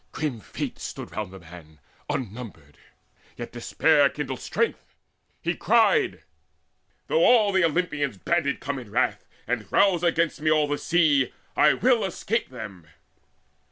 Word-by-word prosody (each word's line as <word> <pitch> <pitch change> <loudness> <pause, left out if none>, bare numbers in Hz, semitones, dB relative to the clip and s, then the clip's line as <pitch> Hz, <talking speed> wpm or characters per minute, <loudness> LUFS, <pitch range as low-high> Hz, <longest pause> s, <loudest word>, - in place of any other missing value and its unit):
Grim 145 -7 -3
Fates - - -6
stood - - -7
round 105 -3 -5
the 95 - -10
man 80 -3 -14 0.3
Unnumbered; 105 - -6 0.6
yet - - -7
despair - - +3
still - - -8
kindled - - -4
strength. - - -2 0.5
He 170 - 0
cried: 235 - +2 0.8
"Though 485 +1 +2
all 220 - +5
the 190 -2 +3
Olympians 150 - 0
banded 155 - 0
come 140 +1 -4
In 120 -4 -11
wrath, - - 0 0.2
and 115 -4 -3
rouse 195 -4 +4
against 165 -3 +1
me 155 - +1
all 155 -1 +3
the 145 0 -2
sea, 155 -6 +2 0.2
I 150 - +5
will 245 -3 +3
escape 210 +5 -2
them!" 105 -9 -9
145 Hz, 145 wpm, -25 LUFS, 110-175 Hz, 0.8 s, all